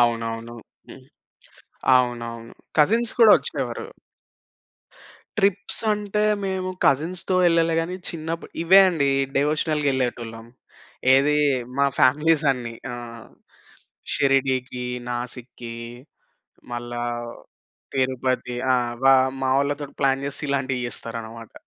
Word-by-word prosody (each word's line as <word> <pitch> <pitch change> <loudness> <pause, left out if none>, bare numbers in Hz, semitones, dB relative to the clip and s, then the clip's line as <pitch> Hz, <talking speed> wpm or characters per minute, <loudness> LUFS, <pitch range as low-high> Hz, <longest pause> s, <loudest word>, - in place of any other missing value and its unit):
అవునవును. 115 0 -1 0.3
హ్మ్. - - -13 0.9
అవునవును. 115 -2 -2 0.2
కజిన్స్ 225 +9 +3
కూడా 220 -2 +9
వచ్చేవారు. - - -4 1.5
ట్రిప్స్ 200 0 +1
అంటే 210 0 -2 0.2
మేము 190 -1 -2 0.2
కజిన్స్‌తో 175 +7 +1
యెళ్ళలే 165 -1 +3
గాని 170 +2 -4
చిన్నప్పుడు 165 0 -5
ఇవే 190 +4 +7
అండి 155 -6 +1 0.3
డివోషనల్‌గా 150 +1 +1
యెళ్ళేటోళ్ళం. 120 -3 -3 0.7
ఏదీ 140 +2 +3 0.4
మా 140 - +4
ఫ్యామిలీసన్నీ. 135 -3 +2 0.2
ఆ! - - -5 1.2
షిరిడీకి, 130 -2 +1 0.3
నాసిక్‌కి, 120 -1 -6 1.0
మళ్ళా 120 0 -5 0.9
తిరుపతి. 130 -1 -1 0.2
ఆ! - - +3 0.3
వా 135 0 +8 0.3
మా 130 - +1
వాళ్ళతోటి 145 0 -2
ప్లాన్ 135 0 +2
జేస్తే 145 +1 -4
ఇలాంటియి 135 -3 -1
జెస్తారన్నమాట. 115 0 -7
135 Hz, 90 wpm, -23 LUFS, 120-160 Hz, 1.5 s, కూడా